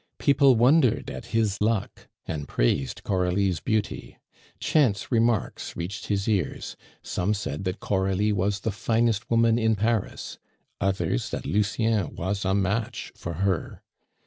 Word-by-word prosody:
People 140 -2 +5
wondered 125 +2 +3
at - - -8
his 110 -3 0
luck, 110 -1 -1 0.2
and 75 -3 -4
praised 65 +2 0
Coralie's 90 -1 +1
beauty. 110 +6 -2 0.4
Chance 125 -11 +1
remarks 115 -2 0
reached 85 +5 -5
his 100 -1 -1
ears; 100 -9 -1 0.3
some 100 +4 -1
said 95 -3 -4
that 95 +2 -2
Coralie 95 +2 +1
was 100 0 0
the 110 - -1
finest 110 +1 0
woman 115 0 +3
in 110 -1 +2
Paris, 110 0 -2 0.4
others 95 -9 0
that - - -5
Lucien 105 -2 0
was 95 +3 -2
a 95 +1 +2
match 100 +3 -1
for 85 - -6
her. 95 -6 -2
100 Hz, 135 wpm, -26 LUFS, 95-115 Hz, 0.4 s, People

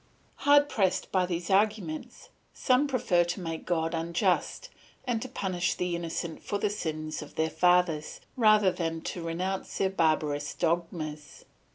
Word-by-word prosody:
"Hard 290 0 +5
pressed 195 -9 0
by 185 -2 +2
these 175 +1 -3
arguments, 195 -5 0 0.3
some 255 +3 +3
prefer 185 -10 +2
to 175 +3 -3
make 165 -3 -5
God 165 -2 0
unjust 170 - 0 0.4
and 235 -3 -1
to 260 - -5
punish 180 -5 -1
the 180 -1 -1
innocent 170 -1 -4
for 205 - -2
the 200 0 0
sins 155 -6 -4
of 150 - -11
their 160 0 0
fathers, 175 -4 +2 0.2
rather 215 -5 +5
than 165 -2 -3
to 175 - -5
renounce 180 +3 -3
their 190 -1 +1
barbarous 155 -4 0
dogmas. 165 -3 -3
175 Hz, 150 wpm, -28 LUFS, 160-195 Hz, 0.4 s, Hard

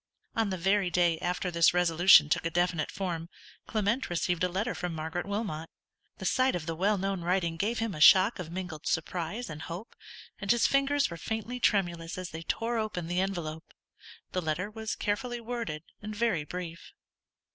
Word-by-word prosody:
On 225 -2 +1
the 190 - -2
very 190 +1 +2
day 175 -2 +2
after 180 +1 -2
this 170 0 +4
resolution 175 -2 +6
took 150 - +1
a 165 - 0
definite 175 -2 0
form, 175 -3 -4 0.4
Clement 220 +4 0
received 175 0 0
a 180 - +2
letter 205 +7 -1
from 175 -2 -4
Margaret 160 +4 -3
Wilmot. 200 -6 -3 0.5
The - - -7
sight 260 -3 +3
of 170 -3 -4
the 165 - -2
well 200 +5 +2
known 195 -1 -2
writing 170 -1 0
gave 210 +7 -1
him 225 -2 -1
a 150 - -6
shock 190 +6 +7
of 170 -2 -6
mingled 175 -4 -5
surprise 175 +8 -2
and 155 -1 -7
hope, 175 +9 -7 0.4
and 200 -1 -6
his 235 0 +4
fingers 275 -2 +2
were 170 - -5
faintly 225 +6 -4
tremulous 175 -7 +1
as 185 -1 -5
they 160 - -6
tore 230 +7 -1
open 210 -6 -3
the 175 +2 0
envelope. 170 -5 -4 0.6
The 185 - -1
letter 170 +5 -2
was 220 0 -4
carefully 240 +4 -2
worded, 230 -10 -4 0.2
and 210 +1 -6
very 205 -9 +1
brief. 170 0 -7
180 Hz, 185 wpm, -29 LUFS, 165-215 Hz, 0.6 s, shock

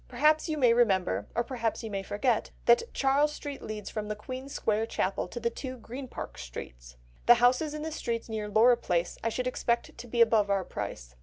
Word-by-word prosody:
Perhaps 305 +6 +3
you 310 - -1
may 245 -5 +5
remember, 190 - +2
or 235 - +2
perhaps 230 -2 -2
you 220 - -5
may 195 -1 -2
forget, 215 +4 0 0.2
that 240 - +4
Charles 280 +2 +2
Street 285 -2 -7
leads 215 -2 -6
from 215 -1 -4
the 210 - -3
Queen's 255 +5 -7
Square 220 -2 0
Chapel 190 -4 -1
to 240 - -6
the 235 0 -1
two 255 +2 -6
Green 250 +3 -8
Park - - -7
Streets. - - -9 0.3
The 240 - +10
houses 250 +6 +3
in 305 - -5
the 320 - -3
streets 230 -6 -3
near 215 -2 -4
Laura 235 +3 +5
Place 175 -6 -1
I 230 - +1
should 250 +2 -2
expect 240 -1 -1
to 245 - -9
be 235 +1 -3
above 225 -3 +5
our 195 -1 +2
price. - - -6
235 Hz, 215 wpm, -29 LUFS, 210-255 Hz, 0.3 s, The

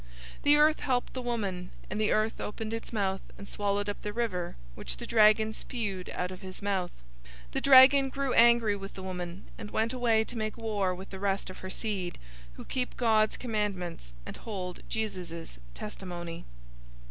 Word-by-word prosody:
012:016 - - -19
The 290 +1 +6
earth 305 +1 +5
helped 250 -2 0
the 255 - -3
woman, 200 -7 -2 0.2
and 210 +3 -2
the 215 - +2
earth 215 +1 +1
opened 220 +1 -4
its 225 - -5
mouth 195 -4 0 0.2
and 200 - -9
swallowed 205 0 -1
up 205 - -4
the 210 - -3
river 205 -6 -2 0.2
which - - -5
the - - -6
dragon 215 0 +5
spewed 205 -7 -4
out 180 0 -2
of 185 +1 -9
his 185 -1 -8
mouth. 195 -3 -1 0.6
012:017 - - -21
The - - -1
dragon 270 0 +8
grew 275 -1 -1
angry 235 -3 +6
with 195 0 -8
the 190 - -7
woman, 180 0 -5
and 210 - -6
went 225 +3 0
away 235 -3 +3
to 240 - -8
make 215 -1 -2
war 205 -5 0
with 190 +2 -10
the 190 - -6
rest 195 -1 -1
of - - -11
her 185 - -6
seed, 190 -4 -3 0.4
who - - -10
keep 250 -1 -2
God's 220 -3 +3
commandments 195 - -3
and - - -7
hold 185 -5 -5
Jesus' 180 - -4 0.2
testimony. 175 -5 -6
210 Hz, 185 wpm, -30 LUFS, 185-230 Hz, 0.6 s, dragon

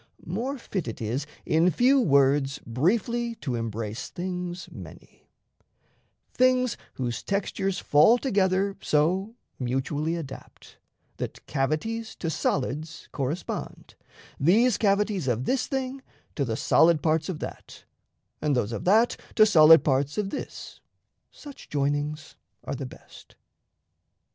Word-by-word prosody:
More 240 +11 -3
fit 195 - -4
It 115 - -5
is 120 +7 -3 0.2
in 165 +3 +3
few 255 - +4
words 140 - +3
briefly 230 - 0
to 135 - -4
embrace 115 -1 -4
Things 180 0 -5
many: - - -13 1.0
things 255 -1 +3 0.2
whose 120 -3 -3
textures 195 -1 -2
fall 155 +12 +5
together 195 -5 +1
So 185 +9 +1 0.2
mutually 140 +5 -1
adapt, 145 -6 -10 0.4
that - - -6
cavities 155 +12 -2
To 165 - -3
solids 150 +2 -2
correspond, 145 +6 -4 0.5
these 215 - +4
cavities 200 - +1
Of 120 0 0
this 265 - 0
thing 265 -1 -3 0.3
to 140 - -1
the 115 -2 -2
solid 160 +3 +4
parts 160 +1 +1
of 180 - -3
that, - - -9 0.6
And 150 -2 +1
those 120 -3 0
of 115 - -5
that 220 +6 +4 0.2
to 215 - +7
solid 165 -5 +7
parts 140 +1 0
of 200 -2 -1
this - - -7 0.5
Such 290 -2 -12
joinings 145 +2 -2 0.3
are - - -4
the - - -5
best. - - -15
165 Hz, 125 wpm, -26 LUFS, 140-210 Hz, 1.0 s, to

